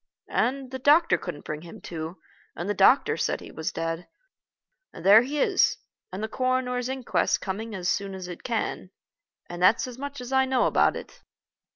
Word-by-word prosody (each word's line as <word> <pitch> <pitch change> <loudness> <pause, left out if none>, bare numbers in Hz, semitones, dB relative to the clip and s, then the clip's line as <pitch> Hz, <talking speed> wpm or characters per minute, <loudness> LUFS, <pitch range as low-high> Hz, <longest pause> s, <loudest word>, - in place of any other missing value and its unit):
And, 265 +1 -1
the 260 - -5
doctor 295 - +5
couldn't 145 -3 -7
bring 155 0 -5
him 170 0 -11
to, 160 +1 -6 0.4
and 175 - -5
the 205 - +1
doctor 205 +8 +4
said - - -1
he - - -11
was 160 - -4
dead. 165 +1 -4 0.8
And 165 - -11
there 205 +3 +9
he 285 +4 -3
is. - - +3 0.3
And 190 +3 -5
the - - -1
coroner's 255 +1 -1
inquest's 265 -2 0
coming 215 +3 -5
as 180 -2 -3
soon 195 0 -1
as 185 -1 -7
it 175 - -8
can. 225 -5 -3 0.6
And 175 0 -7
that's 200 +5 +4
as 250 -1 -9
much 285 0 -6
as 250 +1 -7
I 265 0 +4
know 260 -1 +2
about - - +3
it." - - -10
220 Hz, 190 wpm, -26 LUFS, 180-260 Hz, 0.8 s, there